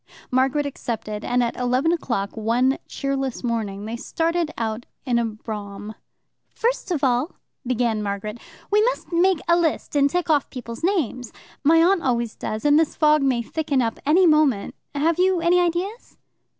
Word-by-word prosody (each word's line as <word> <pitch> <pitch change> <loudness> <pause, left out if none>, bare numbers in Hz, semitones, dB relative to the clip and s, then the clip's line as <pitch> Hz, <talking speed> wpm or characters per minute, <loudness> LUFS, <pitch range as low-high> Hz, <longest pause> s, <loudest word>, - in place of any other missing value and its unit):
Margaret 265 +3 +2
accepted, 220 -6 -4
and 245 0 +1
at 235 - -2
eleven 250 +5 +1
o'clock 235 -12 -2
one 235 +5 +1
cheerless 270 -2 -3
morning 215 -4 -2
they 225 +2 -4
started 330 +6 -1
out 225 +1 -3 0.2
in 240 -2 +2
a 235 - +1
brougham. 210 -1 -6 0.6
"First 475 -2 -1
of 325 -6 -1
all," 255 +5 +1 0.3
began 235 -3 0
Margaret, 210 +2 -4 0.3
"we 420 +1 +5
must - - -2
make 350 0 +3
a 340 - +5
list 335 -3 -1
and 285 0 +4
tick 355 +4 -1
off 300 -4 +2
the - - -24
people's 235 0 -7
names. 275 - -1 0.3
My 325 +3 +5
aunt 365 +1 +3
always 235 -4 0
does, 215 +3 -5
and 295 +1 +5
this 320 - 0
fog 305 -1 +4
may 255 -3 +1
thicken 295 +1 -1
up 230 -2 -1
any 330 +6 +4
moment. 305 -10 +3 0.2
Have 320 +4 +1
you 370 -1 +3
any 340 +1 +3
ideas?" 355 +6 -2
265 Hz, 170 wpm, -23 LUFS, 230-330 Hz, 0.6 s, we